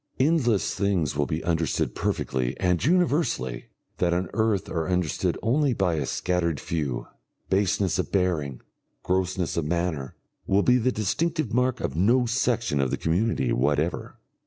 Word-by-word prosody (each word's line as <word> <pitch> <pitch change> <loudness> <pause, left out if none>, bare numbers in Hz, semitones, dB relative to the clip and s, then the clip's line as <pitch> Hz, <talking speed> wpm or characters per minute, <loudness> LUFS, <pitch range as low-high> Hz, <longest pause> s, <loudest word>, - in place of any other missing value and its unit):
Endless 130 - +2
things 95 -7 0
will 70 0 0
be 80 +1 -3
understood 80 -2 0
perfectly 65 -1 -2
and 90 -2 +1
universally 145 - +1 0.3
that 85 -1 +2
on 90 -1 -2
earth 105 -2 +1
are 80 0 -2
understood 90 -5 0
only 135 +3 +2
by 95 -5 +1
a 80 - -2
scattered 85 -4 -1
few; 75 -6 -3 0.5
baseness 95 -1 +1
of 90 - -2
bearing, 80 -9 0 0.4
grossness 95 -1 -1
of 85 - 0
manner, 80 -4 -2 0.3
will 100 +1 +3
be 125 0 +4
the 130 +2 +1
distinctive 155 - -1
mark 125 +1 +1
of 65 - -3
no 120 +9 +3
section 115 - 0
of 65 - 0
the - - -1
community 80 - 0
whatever. 75 +6 0
90 Hz, 150 wpm, -26 LUFS, 80-115 Hz, 0.5 s, be